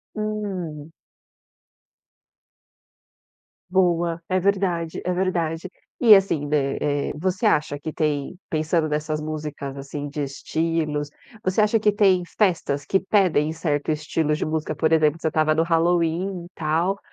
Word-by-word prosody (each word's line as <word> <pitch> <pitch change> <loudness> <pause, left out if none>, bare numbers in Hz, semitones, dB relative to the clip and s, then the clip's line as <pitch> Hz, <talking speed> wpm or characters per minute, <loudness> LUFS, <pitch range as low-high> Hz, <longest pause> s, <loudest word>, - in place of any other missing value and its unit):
Hum. 190 -8 -4 2.8
Boa. 175 -2 +2
É 185 0 +1
verdade, 180 -4 0
é 180 - +1
verdade. 175 -2 -1 0.3
E 225 -4 +9
assim, 180 -7 +1
né, 140 -2 0
eh, 145 -1 0
você 185 +7 -1
acha 150 -7 +2
que 155 +2 -6
tem 150 0 -1
pensando 155 0 0
nessas 150 0 -2
músicas, 150 -3 -5
assim, 145 +1 -6
de 145 +1 -3
estilos, 150 +1 -2 0.3
você 185 +2 +2
acha 215 +1 +3
que 210 0 +3
tem 195 -3 +3 0.2
festas 170 -8 +1
que 190 +7 +1
pedem 185 -7 +2
certo 150 -2 -1
estilo 155 0 -1
de 150 - -1
música? 155 0 -2
Por 155 +2 +1
exemplo, 155 0 +3
você - - 0
estava 155 0 +2
no 160 - +2
Halloween, 170 +2 +1
e - - -11
tal, 165 +5 0
160 Hz, 135 wpm, -23 LUFS, 150-185 Hz, 2.8 s, E